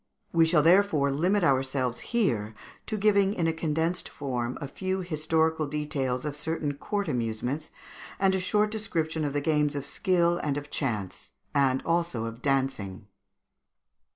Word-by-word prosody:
We 165 -1 +5
shall, 160 -3 +4
therefore, 170 -5 +4
limit 180 +8 +2
ourselves 130 -3 +1
here 115 - 0 0.3
to 215 - -2
giving 200 -1 +3
in 170 - 0
a 165 - +2
condensed 160 +2 -1
form 125 -3 -3
a 140 - -5
few 190 +5 -3
historical 160 -2 0
details 140 -3 -2
of 150 -1 -3
certain 150 -1 -2
court 200 +8 -3
amusements, 120 +4 -2 0.5
and 190 0 +3
a 190 - +1
short 210 +3 +2
description 165 -8 -2
of 145 -2 -1
the 145 - 0
games 150 -1 +1
of 140 -1 -3
skill 175 +1 +2
and 145 -2 -1
of 145 0 -7
chance, 105 -9 -3 0.2
and 135 -2 +2
also 165 -9 0
of 115 +1 -7
dancing. 130 -8 -1
150 Hz, 155 wpm, -28 LUFS, 135-175 Hz, 0.5 s, We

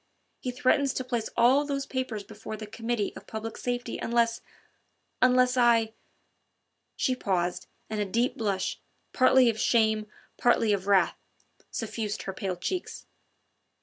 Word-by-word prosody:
He 255 - -4
threatens 265 +2 +2
to 255 - -1
place 240 -3 -2
all 250 +5 +5
those 280 -1 -2
papers 255 -6 -3
before 215 +1 -8
the 215 - -7
Committee 225 0 -2
of - - -11
Public 220 +1 -5
Safety 245 -1 -3
unless... 230 0 +1 0.8
unless 250 0 +4
I...." 230 -2 +4 1.0
She 255 - +1
paused, 180 -6 -1 0.2
and 215 - -3
a 205 - +1
deep 235 +6 0
blush, 200 -4 -2 0.3
partly 255 0 +5
of 225 -2 +1
shame, 220 -2 +2 0.3
partly 230 -3 +3
of 195 -1 -2
wrath, 200 -2 +3 0.5
suffused 220 -2 -4
her 190 - -4
pale 190 -1 -3
cheeks. 355 - -4
230 Hz, 140 wpm, -28 LUFS, 210-250 Hz, 1.0 s, all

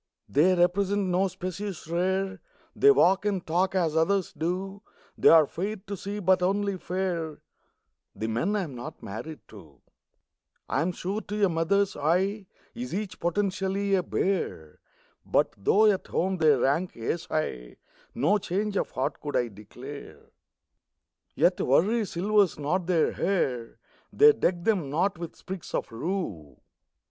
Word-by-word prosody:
They 175 +6 +4
represent 190 +2 +1
no 185 +2 +2
species 185 +1 -6
rare, 190 +2 -1 0.3
They 420 - +5
walk 195 - +5
and 200 -4 -1
talk 180 +4 0
as 165 -4 +1
others 185 +3 +1
do; 185 +5 -3 0.3
They're 160 -2 +6
fair 195 +9 -4
to 200 0 -7
see 200 +2 -5
but 190 -2 +3
only 200 +1 0
fair 175 -4 -3 0.8
The 110 - -4
men 120 - 0
I 205 - 0
am 150 -6 -7
not 120 -1 -8
married 130 +10 -7
to. 80 - -15 0.9
I'm 160 +7 0
sure 185 +3 -4
that - - -24
to 210 0 +1
a - - +1
mother's 180 +4 +1
eye 185 +7 0 0.3
Is 245 -4 -5
each 195 -2 -4
potentially 195 +2 -1
a 190 - +4
bear. 175 - -2 0.4
But - - +1
though 200 - +3
at 205 -3 +2
home 190 +1 0
they 160 -2 +4
rank 145 +7 0
ace 160 +9 -3
high, 65 - -3 0.4
No 205 +1 +2
change 200 +3 -2
of - - -1
heart 130 - -3
could 145 -1 -4
I 120 -1 +1
declare. 125 +7 -11 1.0
Yet - - +3
worry 205 - +2
silvers 200 +1 +2
not 165 +5 -1
their 170 -3 +2
hair; 130 -11 -1 0.3
They 445 +1 +7
deck 175 - 0
them 185 -10 +1
not 175 +5 0
with 170 -1 -7
sprigs 190 -2 -7
of - - -3
rue. 115 - -4
185 Hz, 150 wpm, -27 LUFS, 155-195 Hz, 1.0 s, They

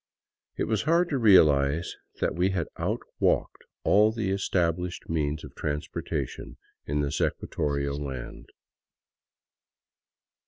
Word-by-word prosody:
It - - 0
was 110 -2 0
hard 170 +6 +2
to 140 - 0
realize 80 - +4 0.3
that - - +1
we 90 +3 +1
had 95 -5 -1
outwalked - - -1 0.2
all 105 +2 +5
the 110 -4 -2
established 90 -2 -1
means 75 -2 -1
of - - -10
transporta 75 0 -3
tion - - -10 0.3
in 75 +1 0
this 70 -1 -2
equatorial 70 -1 -1
land. 65 -3 -7
85 Hz, 115 wpm, -27 LUFS, 75-100 Hz, 0.3 s, all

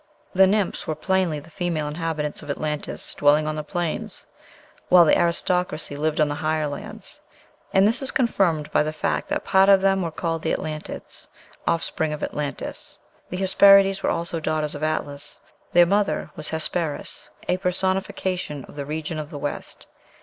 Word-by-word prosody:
The 190 0 +6
Nymphs 200 -1 0
were 155 - -1
plainly 170 0 0
the 160 +3 -15
female 165 -3 -2
inhabitants 150 -1 -3
of - - -11
Atlantis 150 +1 -3
dwelling 145 +1 +4
on 155 0 -2
the 155 - -3
plains, 170 +1 -3 0.6
while 180 -1 +8
the - - +5
aristocracy 175 -2 +1
lived 155 +1 -1
on 155 - +4
the 145 - -2
higher 155 +1 0
lands. 145 -1 -7 0.5
And 195 +1 +5
this 230 +6 +1
is 270 - -1
confirmed 180 - +1
by - - +3
the 155 +1 -1
fact 155 - -1
that - - -1
part 195 0 +5
of 195 -1 +7
them 195 0 +3
were 170 - -1
called 165 0 -3
Atlantids, 155 -1 -4 0.4
offspring 160 -1 0
of 150 - -5
Atlantis. 145 -2 -5 0.3
The 180 - -4
Hesperides 195 0 +6
were - - +1
also 170 0 -2
"daughters 155 -1 -1
of 145 - -7
Atlas;" 145 -2 -3 0.3
their 175 0 +7
mother 200 +3 0
was 155 - -4
Hesperis, 160 -1 -2 0.2
a 180 - +2
personification 185 -5 -2
of - - -14
"the 140 -1 -6
region 155 +1 -3
of 150 -1 -6
the 155 - -7
West." 145 0 -5
160 Hz, 170 wpm, -24 LUFS, 150-185 Hz, 0.6 s, while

